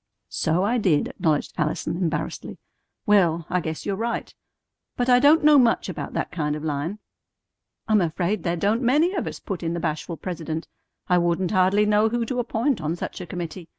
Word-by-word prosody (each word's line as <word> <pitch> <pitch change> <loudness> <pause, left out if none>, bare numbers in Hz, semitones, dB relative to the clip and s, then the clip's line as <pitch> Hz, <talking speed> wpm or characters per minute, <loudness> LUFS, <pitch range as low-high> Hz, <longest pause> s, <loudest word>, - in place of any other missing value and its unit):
"So 165 +4 0
I 235 +4 +1
did," 170 -9 +2
acknowledged 155 -3 -1
Allison 155 +2 -1
embarrassedly. 165 -3 -3 0.5
"Well, 170 -6 +3
I 180 - +2
guess 160 -1 -5
you're 200 - -1
right. 230 +3 -3 0.6
But 245 0 0
I 245 0 +6
don't 295 +4 +5
know 300 -1 +7
much 235 -3 +2
about - - -5
that - - -2
kind 150 -3 -2
of 150 - -6
line." 155 +6 -2 0.9
"I'm 215 -2 +4
afraid 175 +4 -1
there 170 +1 -1
don't 210 +7 +1
many 295 +9 +3
of 365 - -2
us," - - -6
put 195 -4 -5
in 170 0 -2
the - - -2
bashful 165 +1 -3
president. 165 -2 -5 0.4
"I 180 -1 +4
wouldn't 175 +1 0
hardly 190 +2 +3
know 210 +1 +3
who 235 +1 -1
to 250 +2 -3
appoint 240 - 0
on 155 +2 -1
such 175 - -6
a 180 - -7
committee. 170 0 -6
185 Hz, 190 wpm, -24 LUFS, 165-225 Hz, 0.9 s, know